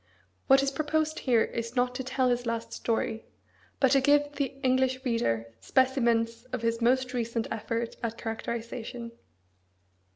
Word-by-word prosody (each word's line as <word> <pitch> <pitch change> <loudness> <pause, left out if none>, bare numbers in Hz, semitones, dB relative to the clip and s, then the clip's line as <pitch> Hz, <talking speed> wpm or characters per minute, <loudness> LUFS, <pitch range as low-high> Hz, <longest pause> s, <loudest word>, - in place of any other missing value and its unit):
What 270 0 +6
is 275 - +1
proposed 310 +2 0
here 240 -4 +3
is 230 +1 -4
not 250 0 +2
to 260 +1 -4
tell 260 0 +1
his 245 0 -1
last 230 0 -3
story, 225 -1 -2 0.5
but 265 -2 +4
to 275 -1 +5
give 290 +1 +4
the 285 -1 -1 0.2
English 260 0 +2
reader 115 - 0
specimens 235 - +2
of 255 -2 -5
his 230 0 0
most 255 +2 +2
recent 230 -1 -1
effort 230 +1 -3
at 230 -1 -3
characterisation. 235 +1 -5
245 Hz, 150 wpm, -28 LUFS, 230-260 Hz, 0.5 s, What